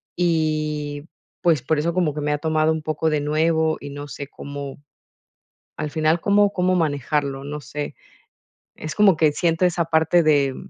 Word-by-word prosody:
y, 155 -3 -1 0.4
pues, 165 -6 +3
por 155 +5 0
eso 170 +3 0
como 170 -5 0
que 150 - -3
me 150 0 -1
ha 145 - 0
tomado 155 0 +1
un 160 -1 -2
poco 155 +1 -1
de 150 -1 +1
nuevo. 160 +1 +1
Y 145 0 -8
no 145 +1 -7
sé 140 0 -7
cómo, 140 -1 -8 1.0
al 150 - -3
final, 155 +2 +1
cómo 205 0 +4
cómo 185 0 +2
manejarlo, 145 -3 -1
no 150 +1 -5
sé. 145 +3 -6 0.8
Es 155 - -6
como 205 -4 +5
que 155 -1 +3
siento 165 +3 0
esa 175 -2 +1
parte 160 +1 +3
de 140 -3 +3
155 Hz, 175 wpm, -22 LUFS, 145-165 Hz, 1.0 s, como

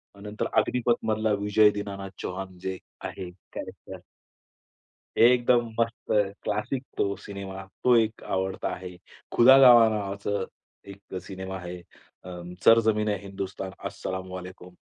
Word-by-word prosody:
अ, - - -16
नंतर 105 +1 -3
अग्निपथ 120 -2 0
मधला 110 0 +1
विजय 105 +1 +5
दीनानाथ 100 -1 -5
चौहान 95 0 -6
जे 95 0 -4 0.2
आहे 90 -2 -6 0.2
कॅरेक्टर. - - -8 1.2
एकदम 120 0 +5
मस्त 115 0 -1 0.3
क्लासिक 125 +5 -2
तो 100 0 +1
सिनेमा. 95 -1 -7 0.2
तो 125 - +6
एक 110 -1 +1
आवडता 95 0 -2
आहे. 90 -1 -9 0.4
खुदा 130 +3 +8
गवाह 120 -4 +8
नावाचं, 100 -1 -2 0.4
एक 100 0 -12
सिनेमा 95 0 -6
आहे, 90 0 -7 0.5
अं, 90 -1 -8
सर 115 0 +8
जमीन 105 0 -1
आहे 105 -2 0
हिंदुस्तान 95 -1 -5 0.2
अस्सलाम 95 0 -5
वालेकुम 90 0 -9
100 Hz, 130 wpm, -27 LUFS, 95-110 Hz, 1.2 s, खुदा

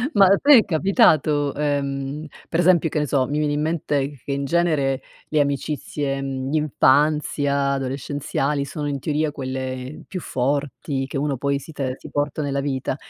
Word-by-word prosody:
Ma 200 -1 +7
a 195 +1 +5
te 285 -2 +8
è 220 - +4
capitato, 155 -5 +3
ehm, 140 0 -2 0.2
per 165 - 0
esempio, 170 -2 +4
che 150 - -1
ne 150 - -1
so, 130 -2 +1
mi 145 - -2
viene 150 -1 0
in 150 - 0
mente 145 -4 -1
che 140 - -4
in 140 0 -1
genere 145 -5 +1 0.3
le 150 - +1
amicizie, 140 -1 -1
mhmm, 135 -1 -3
d'infanzia 145 -1 +2
adolescenziali 140 +1 -2
sono 145 +1 -4
in 140 -1 -2
teoria 150 +1 -1
quelle 130 0 -5
più 185 - -5
forti 140 0 -2
che 135 - -4
uno 140 -2 -1
poi 140 +1 0
si 160 - -11
te 135 -3 -3
si - - -11
porta 145 +1 -2
nella 140 -1 -1
vita. 135 -2 -2
145 Hz, 175 wpm, -22 LUFS, 135-150 Hz, 0.3 s, te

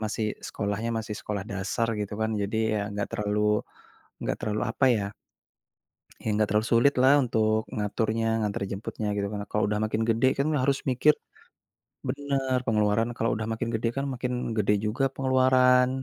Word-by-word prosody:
masih 110 0 -1 0.2
sekolahnya 105 +2 -2
masih 110 -1 -5
sekolah 100 -2 -4
dasar 100 +4 -1
gitu 105 0 -4
kan. 110 0 +1
Jadi 100 +2 -2 0.2
ya 105 - 0 0.2
gak 100 - -2
terlalu 105 0 0 0.8
gak - - -1
terlalu 110 0 -1
apa 125 - 0
ya? 100 - -1 1.2
Ya - - -12
gak 110 - +3
terlalu 105 +2 +1
sulit 120 +5 +5
lah 130 +1 +7
untuk 110 -2 +1
ngaturnya 110 +2 -1 0.2
ngantar 105 -2 -2
jemputnya 105 +2 -4
gitu. 100 -1 0
Karena 105 -1 -4
kalau 105 - +1
udah 105 0 0
makin 110 +1 -1
gede 115 +3 +3
kan 140 - +2 0.2
harus 135 +1 +2
mikir 140 +4 +4 0.9
bener, 135 -1 -1
pengeluaran 105 +1 +2
kalau 115 - 0
udah 110 -1 -3
makin 115 +1 -3
gede 115 +1 0
kan 135 - -1
makin 125 0 -3 0.3
gede 105 -1 +3
juga 110 +6 -1
pengeluaran. 130 -1 +4
110 Hz, 165 wpm, -27 LUFS, 105-125 Hz, 1.2 s, lah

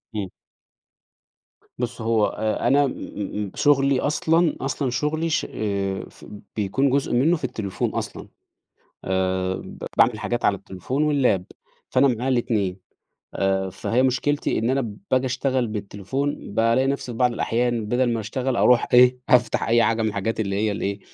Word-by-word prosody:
إمم. 100 -3 -2 1.5
بُص، 120 -2 -4
هو 110 -2 +2
أ 110 +2 -1
أنا 140 +2 +4
م - - -3 0.5
م 95 - -9
شغلي 140 -2 +3
أصلًا 160 +3 +2
أصلًا 135 0 -1
شغلي 150 +6 -1
ش - - 0
آآ، 100 -2 -2
ف - - -16 0.3
بيكون 110 +7 +1
جزء 135 -1 0
منّه 155 +8 +3
في 155 - -16
التليفون 110 -7 -2
أصلًا. - - -5 0.8
آآ، 95 0 0
ب - - -8 0.2
باعمل - - +4
حاجات 120 0 -3
على 100 - +3
التليفون 100 +10 -4
واللاب، 135 -11 +2 0.5
فأنا 135 +2 +4
معايا 125 +2 -1
ال2 105 -7 0 0.5
آآ، 95 -1 0
فهي 120 +6 0
مشكلتي 130 +3 0
إن 115 +3 0
أنا 130 -6 -1 0.2
باجي 130 0 +2
أشتغل 130 0 0
بالتليفون، 105 +5 -4
بالاقي 115 +4 +3
نفسي 135 -3 -2
في 115 - -8
بعض 125 -1 +3
الأحيان 120 -1 0
بَدَل 120 +1 +1
ما 115 - -1
أشتغل 125 +3 -2
أروح 125 -1 +4
إيه، 125 0 +6
أفتح 125 -1 +3
أي 115 0 +4
حاجة 115 0 +1
من 110 - +1
الحاجات 105 +2 -2
اللي 100 -2 -1
هي 105 0 +1
ال - - -5
إيه، 100 0 -2
120 Hz, 160 wpm, -23 LUFS, 105-130 Hz, 1.5 s, إيه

